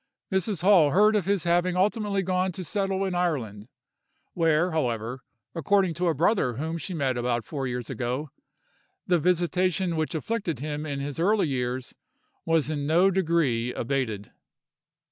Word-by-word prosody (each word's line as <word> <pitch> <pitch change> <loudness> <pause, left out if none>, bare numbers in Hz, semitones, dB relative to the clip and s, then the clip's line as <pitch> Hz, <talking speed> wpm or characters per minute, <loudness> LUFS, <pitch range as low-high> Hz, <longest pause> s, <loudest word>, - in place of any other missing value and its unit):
Mrs. 190 -1 -1
Hall 185 -6 +6
heard 210 +7 +4
of 205 - +1
his 200 -2 +1
having 175 +1 +1
ultimately 200 0 +1
gone 185 0 0
to 185 - -6
settle 195 +1 -1
in 190 - -2
Ireland, 130 - -2 0.6
where, 165 +1 +2
however, 125 -4 -2 0.3
according 190 +1 +2
to 180 +2 -1
a 165 - +1
brother 165 - +2
whom 160 +7 -4
she 180 +4 -5
met 135 -5 0
about 120 -2 -1
four 135 -1 -4
years 125 -1 -4
ago, 130 +4 -3 0.7
the 175 -2 +2
visitation 180 +1 +1
which 160 0 -2
afflicted 190 - -2
him 150 +1 -4
in 140 -1 -3
his 145 +2 -5
early 195 -1 +2
years 125 -1 -3 0.5
was 160 -2 +1
in 145 -2 -2
no 175 +5 +4
degree 160 -10 +1
abated." 115 -5 -2
165 Hz, 155 wpm, -26 LUFS, 135-185 Hz, 0.7 s, Hall